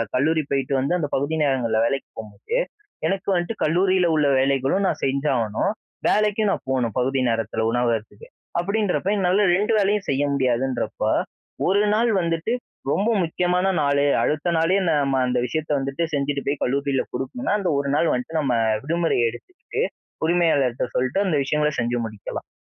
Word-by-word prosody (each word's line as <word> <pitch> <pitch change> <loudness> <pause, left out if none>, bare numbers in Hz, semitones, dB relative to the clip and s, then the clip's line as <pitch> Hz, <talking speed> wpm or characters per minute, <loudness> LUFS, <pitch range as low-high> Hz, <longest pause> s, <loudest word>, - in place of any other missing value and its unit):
கல்லூரி 155 +4 +2
போயிட்டு 135 0 0
வந்து, 135 +6 0
அந்த 150 - -1
பகுதி 145 +4 -1
நேரங்கள்ல 125 -6 +1
வேலைக்கி 135 +3 -1
போகும்போது, 110 - -5 0.5
எனக்கு 195 0 -2
வந்துட்டு 175 +6 -1
கல்லூரியில 180 +3 +3
உள்ள 150 -2 +3
வேலைகளும் 135 +8 +1
நான் - - -2
செஞ்சாகணும். 135 - 0 0.4
வேலைக்கும் 210 0 +2
நான் - - -3
போணும், 120 -4 0
பகுதி 135 +2 +1
நேரத்தில, 115 -1 -1
உணவகத்துக்கு. 120 - -2 0.3
அப்பிடின்றப்போ, 200 0 0
என்னால 190 +2 +2
2 210 +3 0
வேலையும் 205 0 +1
செய்ய 140 +1 +1
முடியாதுன்றப்போ, 130 -1 0 0.6
ஒரு 200 +2 +3
நாள் 235 +2 +2
வந்துட்டு 165 +6 -1 0.4
ரொம்ப 205 +8 +1
முக்கியமான 180 +2 0
நாளு, 140 0 +2 0.2
அடுத்த 155 +3 0
நாளே, 165 +4 +2
நம்ம 140 -3 +2
அந்த 125 0 0
விஷயத்த 155 +4 -3
வந்துட்டு 135 +4 -2
செஞ்சுட்டு 140 0 -1
போய் 140 0 0
கல்லூரியில 140 +1 0
குடுக்கணுனா, 135 - -2
அந்த 190 -3 -1
ஒரு 140 0 -1
நாள் 165 +2 +2
வந்துட்டு, 125 +6 -3
நம்ம 130 -4 +1 0.3
விடுமுறை 165 +3 0
எடுத்துக்கிட்டு, 360 - -7 0.4
உரிமையாளர்ட்ட 160 -8 +2
சொல்லிட்டு, 130 +9 0
அந்த 180 -5 +1
விஷயங்கள 150 +2 +1
செஞ்சு 120 0 0
முடிக்கலாம். 110 -3 -7
145 Hz, 150 wpm, -23 LUFS, 130-180 Hz, 0.6 s, கல்லூரியில